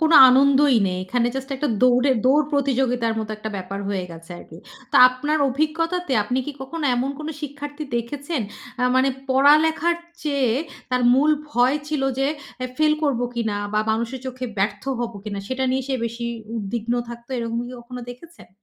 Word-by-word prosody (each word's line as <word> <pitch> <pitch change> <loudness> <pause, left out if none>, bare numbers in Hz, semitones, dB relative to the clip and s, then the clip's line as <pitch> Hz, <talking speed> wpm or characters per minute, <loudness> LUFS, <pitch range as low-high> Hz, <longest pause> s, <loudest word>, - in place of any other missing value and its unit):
কোন 320 +1 +3 0.2
আনন্দই 275 0 +5
নেই। 185 0 -3
এখানে 240 +4 0
জাস্ট 265 +1 -5
একটা 290 +2 -1
দৌড়ে, 250 +2 +4
দৌড় 285 +4 +4
প্রতিযোগিতার 260 -4 +1
মত 220 -1 -3
একটা 215 0 -6
ব্যাপার 195 +1 -5
হয়ে 190 -2 -2
গেছে 165 +1 -12
আরকি। 160 - -13 0.3
তো 285 - +2
আপনার 295 +5 -1
অভিজ্ঞতাতে, 320 +4 -1
আপনি 250 +5 -1
কি 295 - -4
কখনো 290 +4 -5
এমন 255 +3 0
কোন 305 0 -5
শিক্ষার্থী 290 +1 -6
দেখেছেন? 280 +4 -3 0.4
আ - - +1
মানে 260 +1 +4 0.2
পড়ালেখার 310 +5 +4 0.3
চেয়ে, 280 -6 +1 0.4
তার 250 0 +1
মূল 290 +4 +4 0.2
ভয় 250 +2 +3
ছিল 300 -3 -1 0.2
যে, 270 - +2 0.4
এ - - -1
ফেইল 305 +1 +3
করব 280 -5 +1
কিনা 220 -3 -1 0.2
বা 210 - +3
মানুষের 235 +4 -2
চোখে 255 0 -5
ব্যর্থ 205 +1 0 0.2
হবো 235 -3 -4
কিনা? 205 -2 -4
সেটা 260 0 -1
নিয়ে 265 +1 0
সে 270 - 0
বেশি 235 +1 -4 0.3
উদ্বিগ্ন 225 +2 -3 0.2
থাকতো, 235 0 -10
এরকম 230 0 -2
কি - - -9
কখনো 250 +1 -8
দেখেছেন? 330 +8 -14
260 Hz, 175 wpm, -22 LUFS, 235-290 Hz, 0.4 s, আনন্দই